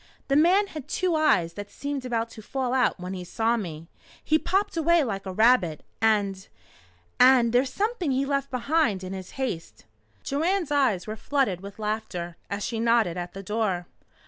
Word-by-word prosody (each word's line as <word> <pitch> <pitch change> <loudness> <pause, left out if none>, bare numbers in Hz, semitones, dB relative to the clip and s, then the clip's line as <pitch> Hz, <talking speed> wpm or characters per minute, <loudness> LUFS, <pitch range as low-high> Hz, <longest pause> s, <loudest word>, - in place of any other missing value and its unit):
The 275 - +3
man 355 +7 +5
had 310 -8 -8
two 370 -2 0
eyes 180 - +3
that 205 +1 -7
seemed 285 -2 -5
about 230 -2 -2
to 220 - -10
fall 255 +2 -2
out 255 -6 +2
when 180 +1 -5
he 185 -1 -5
saw 225 +6 0
me. 165 -7 -6 0.4
He 310 +1 +3
popped 395 +3 0
away 335 0 +3
like 200 -6 -4
a - - -3
rabbit 205 -6 +3 0.2
and 200 -3 +1 0.7
and 250 -2 +6
there's 255 +2 +3
something 420 -5 -1
he 270 +1 +1
left 275 0 -1
behind 255 - +1
in 185 +1 -5
his 190 -1 -7
haste!" 165 - -4 0.4
Joanne's 335 +3 0
eyes 260 -11 +2
were 215 - -5
flooded 220 -7 0
with 200 0 -10
laughter 210 -5 -4
as 200 0 -3
she 230 -1 -3
nodded 230 -6 +2
at 175 0 -5
the 195 - -7
door. 195 -4 -1
230 Hz, 180 wpm, -26 LUFS, 195-280 Hz, 0.7 s, and